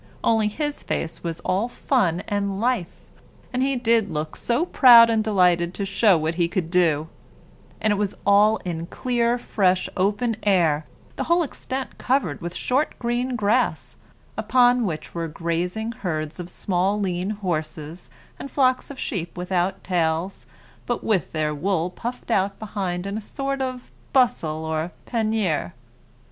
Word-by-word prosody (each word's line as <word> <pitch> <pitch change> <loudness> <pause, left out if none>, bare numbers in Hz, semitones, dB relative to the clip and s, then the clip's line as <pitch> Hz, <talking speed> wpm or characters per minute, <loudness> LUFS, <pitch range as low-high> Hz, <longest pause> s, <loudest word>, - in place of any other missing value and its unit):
Only, 225 -2 +3
his 295 +7 -3
face 165 - -4
was 165 -2 -4
all 195 +5 0
fun 195 - 0
and 200 -1 -1
life, 230 -6 0 0.6
and 250 - 0
he 270 +1 +1
did 230 -4 +2
look 155 0 -4
so 245 +8 0
proud 235 -8 +8
and 220 -1 +2
delighted 180 -4 +2
to 200 - -2
show 195 -1 +4
what 160 +1 -1
he 170 - +3
could 170 -2 -3
do; 160 -4 +2 0.7
and 215 -1 +2
it - - -1
was 205 -1 -1
all 205 +2 +5
in 170 -1 -4
clear, 240 +2 0
fresh, 185 -6 +1
open 205 +4 0
air, 165 -7 +2 0.3
the - - -2
whole 340 +1 +3
extent 265 -2 -5
covered 250 - 0
with 175 +1 -5
short 270 +5 0
green 245 +1 -1
grass, 205 - 0 0.4
upon 245 0 +4
which 155 -4 -5
were 170 -1 -3
grazing 170 +7 -2
herds 160 -7 -4
of 175 0 -6
small 190 +3 0
lean 185 -1 -1
horses, 165 -5 -4 0.3
and 275 - -6
flocks 255 -2 +1
of 280 - -8
sheep 175 -4 -4
without 180 +1 -1
tails, 170 0 -1 0.4
but 240 - -2
with 195 -9 0
their 155 -1 -1
wool 175 +2 -1
puffed 240 +4 -6
out 195 -1 +1
behind 190 -4 -3
into 200 +2 -3
a - - -10
sort 275 +4 -3
of 255 -1 -4 0.2
bustle 170 - +2
or 160 +2 -2
panier. 215 - 0
200 Hz, 155 wpm, -23 LUFS, 170-235 Hz, 0.7 s, proud